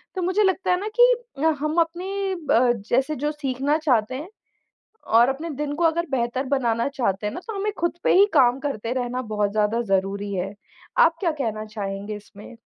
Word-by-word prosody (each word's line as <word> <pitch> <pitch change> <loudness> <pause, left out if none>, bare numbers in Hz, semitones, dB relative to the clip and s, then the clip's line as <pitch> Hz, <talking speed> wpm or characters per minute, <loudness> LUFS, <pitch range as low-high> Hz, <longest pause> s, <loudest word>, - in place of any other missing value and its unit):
तो 370 - -2
मुझे 375 +4 +2
लगता 380 -1 +1
है 360 - +2
ना 415 - -4
कि - - +8 0.5
हम 305 +2 -2
अपने 380 +4 -2
अ, 255 -8 +2 0.2
जैसे 270 +5 +1
जो 295 +3 -1
सीखना 280 0 -1
चाहते 255 -6 +1
हैं, 310 +8 -6 0.8
और 235 +3 +5
अपने 305 +5 -3
दिन 290 0 -3
को 335 +3 -1
अगर 340 +1 +2
बेहतर 255 +1 -1
बनाना 240 -4 +1
चाहते 215 -8 -1
हैं 210 - -2
ना - - -5
तो 445 - -5
हमें 420 +2 -1
खुद 345 0 -1
पे - - +4
ही 400 +2 +7
काम 250 -2 +5
करते 245 -5 -3
रहना 250 0 -2
बहुत 205 -1 +1
ज़्यादा 215 +2 +1
ज़रूरी 200 +1 0
है। 190 +2 -3 0.4
आप 330 0 +5
क्या 350 - +1
कहना 225 -7 -3
चाहेंगे 205 -1 -5
इसमें? 210 +2 -13
265 Hz, 195 wpm, -23 LUFS, 225-330 Hz, 0.8 s, कि